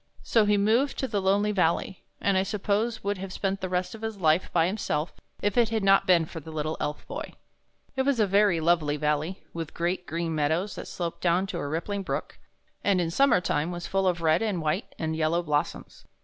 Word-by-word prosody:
So 225 -2 +3
he 205 0 +3
moved 225 +7 +2
to 265 - -1
the 205 -4 -1
lonely 200 +2 +2
valley, 180 -1 0 0.2
and 200 - +1
I 190 - +4
suppose 210 +3 -1
would 200 -1 -1
have 195 0 -6
spent 195 +1 -2
the 185 - -3
rest 180 0 -1
of 225 - -10
his 220 -2 -4
life 160 -1 +2
by 165 -2 +3
himself, 175 -5 -2 0.3
if 205 +3 +2
it 230 -2 +4
had 220 -2 -1
not 195 0 +4
been 175 -3 +5
for 165 - -8
the 160 - -11
little 155 0 -2
Elf 150 0 -4
Boy. - - -6 0.6
It 265 - +1
was 270 -2 +1
a 215 - +5
very 200 -3 +3
lovely 160 -3 +2
valley, 150 +4 -1
with 165 -2 -6
great, 175 +1 -1
green 165 0 -2
meadows 160 +6 0
that - - -7
sloped 170 -2 -4
down 180 +2 +2
to 195 - -4
a - - -3
rippling 170 +7 -2
brook, 190 - -4 0.4
and 195 -2 +3
in 165 -2 0
summer 270 +2 +4
time 165 -1 0
were 175 - -4
full 195 +2 0
of 175 -2 0
red 160 0 +3
and 210 -5 0
white 155 -1 -2
and 160 0 -2
yellow 160 +2 +1
blossoms. 150 -2 -2
185 Hz, 220 wpm, -27 LUFS, 160-205 Hz, 0.6 s, been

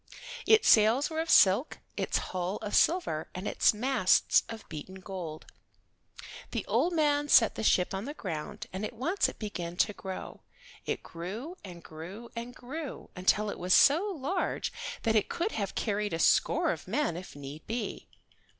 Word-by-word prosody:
Its 440 - +5
sails 225 +8 +5
were 315 - -2
of 325 +1 -2
silk, 200 +9 +5 0.2
its - - 0
hull 185 +2 -3
of 210 - -2
silver, 315 - +2
and 185 +3 -4
its - - +4
masts 230 -3 +3
of 225 -2 -8
beaten 160 +5 -8
gold. 185 -5 -7 1.0
The - - -3
old 355 - +1
man 290 -2 +2
set 230 -6 +6
the - - -5
ship 180 -4 +3
on 195 +3 -3
the 290 +2 -6
ground, 160 - -5
and 190 +3 -4
at 215 - -4
once 335 - +1
it - - -11
began 175 -5 -5
to 210 - +2
grow. 190 -1 -7 0.5
It - - -2
grew 210 - -7
and 175 -4 -10
grew 180 +9 -9
and 235 +2 -6
grew, 280 +4 -7
until 205 +3 +2
it - - -8
was 180 +1 +3
so 300 +6 +6
large 330 +6 -2 0.3
that 225 -2 +2
it 215 - +2
could 360 +6 -1
have 200 -3 -3
carried 210 -3 -1
a - - 0
score - - +3
of - - -6
men 295 - 0
if 180 -2 -8
need 145 +2 -9
be. 230 +1 -4
210 Hz, 175 wpm, -30 LUFS, 185-270 Hz, 1.0 s, set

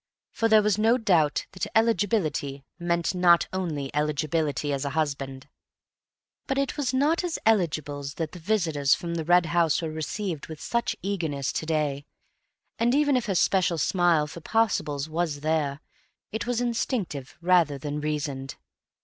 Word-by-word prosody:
For 225 - +1
there 215 -1 +6
was 210 -1 +1
no 225 +3 +4
doubt 175 - +2
that 185 - -4
eligibility 180 - 0
meant 170 0 0
not 175 -2 +4
only 155 -7 -3
eligibility 150 0 0
as 135 0 -2
a 140 - -1
husband. 140 -3 -2 1.0
But 270 - -1
it 275 -1 0
was 285 -4 -1
not 290 +7 +2
as 345 -3 -2
"eligibles" 155 -9 0
that 160 -2 -3
the 180 - -10
visitors 160 -7 +2
from 170 -1 -5
the 165 -1 -2
Red 175 +2 +4
House 165 -1 +2
were 165 -2 -3
received 160 +1 -4
with 160 -1 -8
such 235 0 -1
eagerness 160 -9 -2
to 155 - -3
day, 150 -3 -1 0.7
and 240 +3 +3
even 290 -1 +3
if 250 -3 0
her 195 - 0
special 185 -1 +2
smile 170 -2 +2
for 160 +3 -9
"possibles" 155 -10 0
was 160 -2 -2
there, 150 -2 0 0.5
it 220 +2 -3
was 245 -1 0
instinctive 225 - -2
rather 170 -5 +3
than 145 +2 -4
reasoned. 145 -2 -3
165 Hz, 160 wpm, -26 LUFS, 150-205 Hz, 1.0 s, there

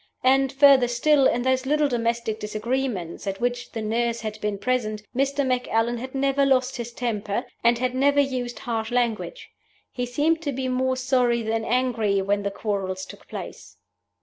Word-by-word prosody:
And, 270 +1 +4
further 275 -2 +6
still, 270 +3 +3
in 245 - 0
those 260 0 +1
little 300 +1 +3
domestic 235 -3 -1
disagreements 215 -4 -3
at 195 0 -3
which 245 0 -2
the 225 - -3
nurse 235 +2 -1
had 215 -1 -5
been 210 -1 -1
present, 215 -1 -1
Mr. 275 +1 +1
Macallan 240 -2 0
had 260 +2 -7
never 275 +1 +2
lost 265 -1 +2
his 235 0 -5
temper, 225 -2 -2 0.2
and 235 0 +4
had 250 +1 -1
never 280 +2 +3
used 255 -3 -1
harsh 225 -2 -3
language: 240 - -2 0.4
he 245 -1 -3
seemed 310 +6 +1
to 295 -3 -2
be 260 0 -3
more 260 0 0
sorry 250 -2 +1
than 225 0 -1
angry 230 -4 +1
when 200 +1 0
the 200 - -1
quarrels 195 -2 -3
took - - -13
place." - - -9
245 Hz, 175 wpm, -24 LUFS, 220-260 Hz, 0.4 s, further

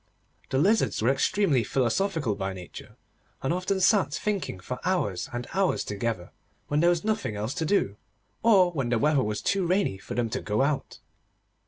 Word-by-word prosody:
The 130 - 0
Lizards 205 +10 +2
were 115 - +4
extremely 145 - +2
philosophical 135 - 0
by 95 -1 -3
nature, 90 -2 -11 0.5
and 135 - +1
often 185 +2 -1
sat 190 -4 +4
thinking 200 - -2
for 125 +8 -6
hours 165 - -1
and 120 0 -4
hours 190 -1 +1
together, 105 -3 -3 0.4
when 145 - +1
there 170 +2 +5
was 175 -2 +1
nothing 215 - -1
else 105 +5 -3
to 165 -1 -2
do, 105 - +1 0.4
or 195 -6 +5
when 135 -7 -2
the 120 - +2
weather 145 +2 +3
was 105 -3 -2
too 195 -1 +1
rainy 185 - +1
for - - -7
them 115 -2 -1
to - - -2
go 105 +4 0
out. 140 0 -2
140 Hz, 180 wpm, -27 LUFS, -, 0.5 s, there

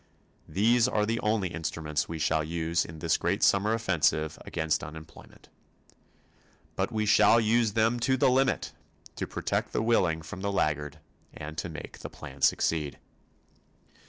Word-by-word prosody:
These 115 +8 +3
are 105 -4 +1
the 115 +2 -1
only 105 -3 0
instruments 80 -2 -3
we 80 - -4
shall 80 0 +1
use 85 +1 -1
in 80 - -10
this 80 +1 +1
great - - -1
summer 100 +2 +4
offensive 80 -7 0
against 80 -1 -1
unemployment. 80 +1 -12 1.3
But - - -1
we 110 -1 -1
shall 105 +2 +5
use 115 -1 +2
them 115 +2 +2
to 130 +3 +1
the 130 - +4
limit 135 +1 +1 0.4
to - - -3
protect - - -2
the - - 0
willing 90 -9 +2
from 90 +4 -8
the 100 +1 -1
laggard 75 -4 -1 0.3
and 75 +1 -7
to 90 - -4
make 80 - -9
the - - -7
plan 70 -3 -11
succeed. 75 +1 +1
85 Hz, 155 wpm, -28 LUFS, 80-110 Hz, 1.3 s, shall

